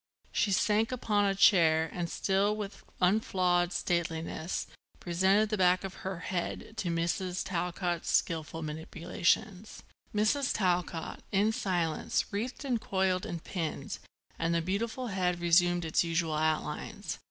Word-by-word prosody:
She 215 -6 +1
sank 210 +4 +2
upon 210 -5 +1
a 195 -1 +1
chair 160 -5 +5
and, 175 -1 -3
still 200 +4 +1
with 210 -2 -6 0.2
unflawed 180 -2 +2
stateliness, 170 -1 -2 0.3
presented 190 +5 +2
the 215 -2 -1
back 180 0 +4
of 195 -1 -5
her 190 -2 -4
head 185 +4 -3
to 180 - -1
Mrs. 175 +2 -1
Talcott's 175 -1 -2
skilful 165 0 0
manipulations. 175 +6 -2 0.3
Mrs. 220 +6 +1
Talcott, 180 -3 -1
in 205 +2 +3
silence, 175 -7 0
wreathed 240 +8 -3
and 245 -4 0
coiled 190 -2 0
and 170 -1 -5
pinned 165 -5 -4 0.4
and 165 +1 +1
the 170 - +2
beautiful 225 +7 -2
head 180 -3 0
resumed 175 0 +3
its 160 - +2
usual 165 -1 0
outlines. 155 0 -2
180 Hz, 130 wpm, -30 LUFS, 170-200 Hz, 0.4 s, chair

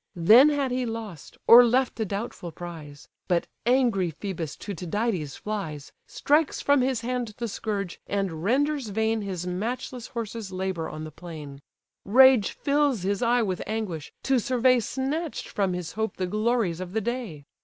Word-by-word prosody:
Then 220 - +7
had 285 -3 0
he 255 0 0
lost, 225 - -7
or 240 +1 +10
left 245 +1 +1
a 220 - +1
doubtful 200 -3 -5
prize; 160 -4 -9 0.2
But 175 -2 +1 0.2
angry 235 -9 +2
Phœbus 165 -3 -5
to 205 - -6
Tydides 180 - -2
flies, 160 -9 -5 0.2
Strikes 300 +1 +1
from 285 -2 +3
his 255 -2 0
hand 240 -3 -3
the 235 - -3
scourge, 200 -3 -4
and 190 -6 -2
renders 280 +4 +1
vain 220 +2 0
His 185 -4 -4
matchless 235 +6 -4
horses' 225 -3 -5
labour 185 -3 -3
on 155 - -7
the 155 - -7
plain. 150 -4 -9 0.4
Rage 255 0 +6
fills 280 -7 0
his 200 +1 -1
eye 240 0 +3
with 185 -4 -2
anguish, 200 -8 -4
to 265 -1 +2
survey 255 +1 +3
Snatch'd 275 +7 -3
from 195 -3 -1
his 180 -2 -4
hope 220 -2 -3
the 185 - -1
glories 215 -3 0
of 185 0 -6
the 220 - 0
day. 220 - -4
215 Hz, 165 wpm, -26 LUFS, 180-245 Hz, 0.4 s, or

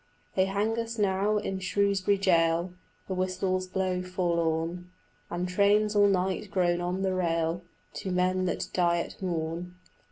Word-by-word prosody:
They 190 - +3
hang 210 +4 0
us 230 0 -4
now 200 +1 +2
in 195 -2 -2
Shrewsbury 200 +2 +1
jail: 170 -2 +2 0.3
The 190 - -2
whistles 185 0 -1
blow 185 -1 -1
forlorn, 170 -1 -1 0.4
And 175 +1 -2
trains 205 +3 +3
all 205 0 +6
night 190 +1 0
groan 175 -3 +1
on 180 +2 -2
the 190 -1 +1
rail 165 -1 0 0.4
To 190 - -4
men 185 +1 +1
that 175 - -2
die 175 -1 +2
at 170 - -6
morn. 170 0 -3
185 Hz, 150 wpm, -28 LUFS, 175-195 Hz, 0.4 s, all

